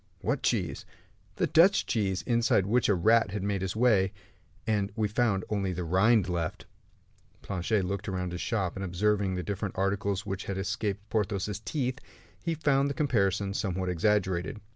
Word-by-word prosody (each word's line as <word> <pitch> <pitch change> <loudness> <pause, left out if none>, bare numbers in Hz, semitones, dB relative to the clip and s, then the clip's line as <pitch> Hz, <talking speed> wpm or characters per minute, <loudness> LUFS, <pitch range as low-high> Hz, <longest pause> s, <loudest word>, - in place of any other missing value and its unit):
"What - - -1
cheese?" - - -1 0.5
"The - - +1
Dutch 185 +5 +5
cheese, 95 -5 -1
inside 115 -5 +2
which 120 +4 +2
a 100 - +4
rat 110 +4 +4
had 100 0 -4
made 100 -1 -1
his 95 0 -3
way, 105 -5 +3 0.5
and 105 -3 0
we 110 -2 +1
found 105 -3 0
only 100 -3 -1
the 90 0 -3
rind 95 +4 +3
left." 85 -3 -3 0.8
Planchet 95 +1 -1
looked 100 +2 -3
all 95 - -3
round 90 -1 -3
his 90 - -4
shop, 100 -7 -1
and 95 - -4
observing 95 +1 0
the 90 - -3
different 100 -1 -4
articles 100 +1 0
which 95 0 -4
had 100 - -3
escaped 105 0 -3
Porthos's 105 -2 -1
teeth, 130 +2 -2 0.4
he 165 -1 -1
found 140 -2 +2
the 140 - -3
comparison 100 -8 +1
somewhat 95 -2 -2
exaggerated. 95 +4 0
100 Hz, 170 wpm, -29 LUFS, 95-110 Hz, 0.8 s, Dutch